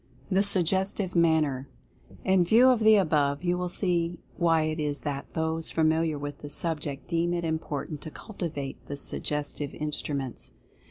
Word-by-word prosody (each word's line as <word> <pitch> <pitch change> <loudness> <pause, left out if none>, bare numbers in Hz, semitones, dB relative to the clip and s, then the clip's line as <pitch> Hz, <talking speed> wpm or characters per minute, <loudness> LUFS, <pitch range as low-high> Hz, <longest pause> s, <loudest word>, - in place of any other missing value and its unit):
THE 190 +1 +4
SUGGESTIVE 190 0 +2
MANNER. 155 -5 +2 0.6
In 190 -2 +4
view 230 +9 +6
of 250 -3 +4
the 220 0 +6
above, 150 -6 +2
you 175 0 +1
will 180 0 -2
see 175 -2 0
why 165 -2 +3
it 155 +1 -2
is 145 -1 -1
that 140 -2 -4
those 160 0 -1
familiar 160 -1 +1
with 145 0 -6
the 145 - -8
subject 145 -3 -2
deem 170 0 0
it 170 -1 -2
important 155 -2 -3
to - - -7
cultivate 155 -8 -6
the 145 - -5
Suggestive 145 0 -3
Instruments. 145 -3 -3
160 Hz, 155 wpm, -27 LUFS, 145-175 Hz, 0.6 s, view